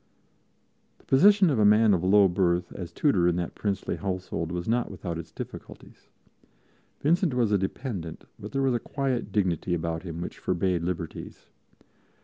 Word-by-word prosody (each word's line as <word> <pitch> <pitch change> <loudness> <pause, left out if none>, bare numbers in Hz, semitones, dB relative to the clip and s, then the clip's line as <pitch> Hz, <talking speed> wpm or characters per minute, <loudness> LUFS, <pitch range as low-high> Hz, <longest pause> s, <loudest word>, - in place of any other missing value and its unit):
The - - -26
position 195 +5 +5
of 130 - +1
a - - +4
man 105 +1 +5
of 90 -2 0
low 100 +1 +6
birth 90 -1 0
as 90 -3 -7
tutor 95 - +2
in 90 - +2
that 85 -1 -3
princely 100 -3 -2
household 90 -4 -3
was 90 -1 -4
not 120 +2 +1
without 85 -3 -5
its 80 -1 -9
difficulties. - - -10 0.9
Vincent 165 -1 +2
was 120 -4 +2
a 105 - +4
dependent; 95 - -5 0.2
but 105 - -8
there 135 0 0
was 135 -2 +2
a 120 - 0
quiet 135 -1 -2
dignity 90 -3 0
about 80 -1 -3
him 85 -3 -7
which 85 - -6
forbade 90 -1 0
liberties. 85 -1 -5
95 Hz, 165 wpm, -27 LUFS, 85-120 Hz, 0.9 s, low